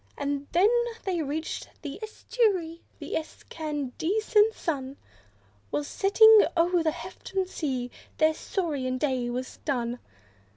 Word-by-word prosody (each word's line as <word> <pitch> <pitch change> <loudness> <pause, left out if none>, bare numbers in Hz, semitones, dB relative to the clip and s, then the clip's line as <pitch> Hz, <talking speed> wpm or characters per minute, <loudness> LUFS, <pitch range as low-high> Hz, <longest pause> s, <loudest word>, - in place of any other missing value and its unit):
And 285 0 -2
when 360 +5 +5 0.4
they 360 -4 -1
reached 310 +2 -4
the 290 +4 -6
estuary, 415 -7 -1 0.2
the - - -7
excandescent 320 - 0
sun 275 -4 -3 0.7
Was 145 +5 -1
setting 440 +2 +7
o'er 345 +1 +3
the 320 - +2
hefted 370 +3 -4
sea; 260 -9 -3 0.3
their 315 0 +4
saurian 290 -8 -2
day 255 -3 0
was 250 +1 -4
done. 245 -4 -2
315 Hz, 115 wpm, -27 LUFS, 270-375 Hz, 0.7 s, setting